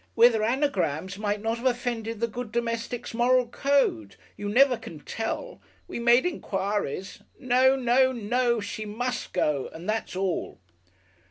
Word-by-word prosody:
" - - -41
whether 230 -1 +6
anagrams 215 - 0
might 205 0 -2
not 225 +1 0
have 245 - -8
offended 235 -3 -2
the 235 - +1
good 240 0 -6
domestic's 235 +1 -3
Moral 250 +2 +3
Code 240 - +1 0.2
you 205 0 -4
never 255 +4 +5
can 165 -8 -10
tell. 225 - -4 0.3
We - - -5
made 240 +3 +5
enquiries. 200 - -2 0.2
No. 260 0 +4
No. 260 0 +3
No. 240 0 0
She 215 +1 -5
must 235 +4 -3
go 150 -6 0
and 165 +3 -9
that's 215 -3 -2
all!" 190 -2 -2
230 Hz, 150 wpm, -26 LUFS, 205-250 Hz, 0.3 s, whether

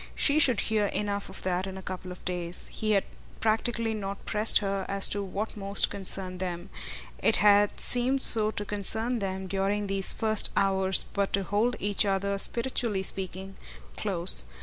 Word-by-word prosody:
She 290 +1 +2
should 255 -8 +3
hear 215 -2 0
enough 205 -1 -4
of 190 - -7
that 185 +1 -2
in 190 0 -8
a 190 - -10
couple 185 0 -7
of 180 - -12
days. 175 -1 -4
He 215 -1 -2
had 195 - +2 0.4
practically 225 +1 -1
not 200 -2 -6
pressed 215 +1 +2
her 195 -1 -2
as 195 0 +4
to 205 - -2
what 200 +2 -5
most 200 -1 +1
concerned 190 -2 -6
them; 180 0 -6 0.5
it 220 - +2
had 205 0 +3
seemed 255 +2 +3
so 215 -2 +3
to 205 -1 -3
concern 220 +4 0
them 190 -1 -5
during 195 +2 -2
these 195 -1 +2
first 220 -1 0
hours 190 -1 +1
but 200 -1 -1
to 195 - +1
hold 210 +6 -1
each 205 0 +1
other, 200 0 -2
spiritually 235 -4 +3
speaking, 190 0 +1 0.4
close. - - +4
200 Hz, 170 wpm, -27 LUFS, 190-215 Hz, 0.5 s, as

